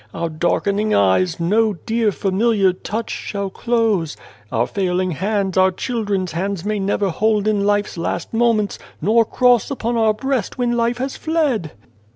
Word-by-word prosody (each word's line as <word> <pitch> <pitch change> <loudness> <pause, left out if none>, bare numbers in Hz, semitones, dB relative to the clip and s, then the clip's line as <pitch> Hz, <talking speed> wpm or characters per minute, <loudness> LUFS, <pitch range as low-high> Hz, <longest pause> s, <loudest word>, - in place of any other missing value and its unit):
Our 170 - -2
darkening 200 +6 0
eyes 130 - +2
no 210 +6 +2
dear 220 +5 0
familiar 195 0 +2
touch 220 +5 -5
shall 200 -2 -4
close; 220 -10 0 0.3
our 120 -1 +1
failing 185 +2 -1
hands 195 +3 -1
our 185 0 +5
children's 200 -3 -2
hands 190 +2 -3
may 210 0 -1
never 200 0 0
hold 210 +3 +1
in 205 -2 +1
life's 205 -3 0
last 175 +3 -3
moments, 225 -3 +1 0.2
nor 230 +3 +3
cross 245 -1 +3
upon 240 -4 -2
our 220 -1 +3
breast 265 +2 -2
when 245 -1 0
life 235 0 0
has 265 +2 -3
fled." 290 - -1
205 Hz, 155 wpm, -20 LUFS, 185-230 Hz, 0.3 s, our